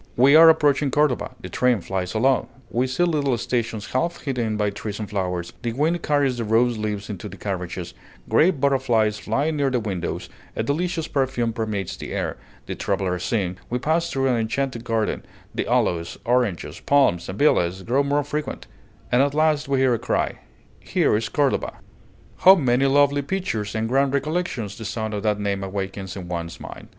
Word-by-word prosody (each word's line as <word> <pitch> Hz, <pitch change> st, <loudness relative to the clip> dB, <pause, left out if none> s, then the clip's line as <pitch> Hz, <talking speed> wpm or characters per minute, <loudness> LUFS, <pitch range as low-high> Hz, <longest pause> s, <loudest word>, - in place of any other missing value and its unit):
We 135 Hz, +4 st, +6 dB
are 165 Hz, +1 st, +10 dB
approaching 145 Hz, -3 st, +3 dB
Cordova, 145 Hz, -2 st, +1 dB
the -, -, -6 dB
train 125 Hz, -3 st, +2 dB
flies 95 Hz, +2 st, -3 dB
along, 130 Hz, +4 st, +2 dB, 0.2 s
we 125 Hz, +2 st, +1 dB
see 130 Hz, +7 st, 0 dB
little 145 Hz, -7 st, +1 dB
stations 115 Hz, -3 st, -2 dB
half 170 Hz, +7 st, -1 dB
hidden 120 Hz, -6 st, -2 dB
by 105 Hz, -1 st, +1 dB
trees 105 Hz, 0 st, -5 dB
and 105 Hz, -, -4 dB
flowers, 90 Hz, -4 st, -3 dB
the 120 Hz, -2 st, -2 dB
wind 160 Hz, +6 st, +1 dB
carries 140 Hz, -5 st, +1 dB
the -, -, -1 dB
rose 115 Hz, +2 st, +2 dB
leaves 105 Hz, -1 st, -3 dB
into 105 Hz, 0 st, -6 dB
the 100 Hz, -, -10 dB
carriages, 90 Hz, -3 st, -4 dB, 0.3 s
great 165 Hz, -2 st, +3 dB
butterflies 120 Hz, -6 st, +2 dB
fly 140 Hz, +10 st, 0 dB
near 145 Hz, -3 st, +1 dB
the 125 Hz, -2 st, 0 dB
windows, 100 Hz, -6 st, -4 dB, 0.3 s
a -, -, -1 dB
delicious 165 Hz, +5 st, -1 dB
perfume 130 Hz, -5 st, 0 dB
permeates 105 Hz, -5 st, -3 dB
the -, -, -7 dB
air, -, -, -2 dB, 0.3 s
the -, -, -4 dB
travelers 90 Hz, -2 st, -1 dB
sing; 95 Hz, -5 st, -1 dB
we 125 Hz, -, 0 dB
pass 160 Hz, +6 st, 0 dB
through 135 Hz, 0 st, -1 dB
an 125 Hz, -2 st, +2 dB
enchanted 115 Hz, +2 st, -2 dB
garden, 115 Hz, -2 st, -1 dB, 0.3 s
the -, -, -2 dB
aloes, 85 Hz, -1 st, 0 dB
oranges, 120 Hz, -7 st, 0 dB
palms, 135 Hz, -12 st, +2 dB
and 95 Hz, -, -5 dB
villas 95 Hz, -, +2 dB
grow 125 Hz, +6 st, +2 dB
more 145 Hz, +1 st, +1 dB
frequent; 150 Hz, +1 st, -4 dB, 0.5 s
and 125 Hz, -, +4 dB
at 140 Hz, +1 st, +1 dB
last 155 Hz, -2 st, +2 dB
we 140 Hz, -1 st, +1 dB
hear 130 Hz, -2 st, +4 dB
a 115 Hz, -, 0 dB
cry -, -, -1 dB, 0.4 s
"Here -, -, +1 dB
is 110 Hz, 0 st, -1 dB
Cordova!" 140 Hz, -2 st, 0 dB, 0.6 s
How 190 Hz, +1 st, +8 dB
many 135 Hz, -4 st, +2 dB
lovely 145 Hz, +1 st, +4 dB
pictures 140 Hz, -, -3 dB
and 110 Hz, 0 st, 0 dB
grand 135 Hz, +3 st, +2 dB
recollections 140 Hz, -, -2 dB
the -, -, -6 dB
sound 110 Hz, 0 st, -3 dB
of 105 Hz, -, -2 dB
that 105 Hz, -1 st, 0 dB
name 100 Hz, -1 st, -1 dB
awakens 95 Hz, -1 st, -5 dB
in 95 Hz, -3 st, -7 dB
one's 85 Hz, -1 st, -5 dB
mind! -, -, -9 dB
120 Hz, 185 wpm, -23 LUFS, 105-140 Hz, 0.6 s, are